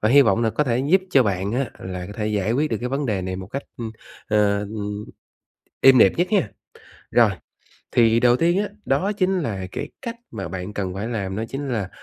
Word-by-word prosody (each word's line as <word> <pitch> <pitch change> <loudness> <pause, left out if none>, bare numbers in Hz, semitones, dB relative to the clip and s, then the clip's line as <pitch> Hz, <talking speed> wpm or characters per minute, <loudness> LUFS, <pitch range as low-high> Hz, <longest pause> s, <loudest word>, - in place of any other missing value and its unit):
và 110 - +2
hy 140 +4 +7
vọng 115 -1 +2
là 115 - +2
có 150 - 0
thể 120 -2 +1
giúp 155 +9 +3
cho 135 - +6
bạn 100 -1 -1
á 125 0 -1
là 90 -1 -6
có 100 - -8
thể 105 0 -3
giải 105 0 0
quyết 150 +5 +1
được 110 - 0
cái 125 - -2
vấn 135 +2 -1
đề 100 -4 -1
này 95 0 -3
một 95 - -7
cách, 140 +8 -5
ưm, 115 -2 -5 0.4
ờ, 105 -1 +3
ừm, 105 0 -5 0.8
êm 135 -1 +8
đẹp 95 - +7
nhất 175 - +2
ha. 190 - +2 0.6
Rồi, - - +5 0.6
thì 115 -1 +4
đầu 120 0 +5
tiên 170 +4 +2
á, 205 0 0 0.2
đó 170 +10 +1
chính 190 -1 +1
là 100 - -3
cái 145 - -4
cách 235 -2 -5
mà 95 -5 -5
bạn 95 +3 -5
cần 95 -3 -3
phải 100 +4 -3
làm 100 -5 -3
đó 110 - -2
chính 140 +1 -4
là, 110 -7 -2
115 Hz, 235 wpm, -23 LUFS, 100-135 Hz, 0.8 s, êm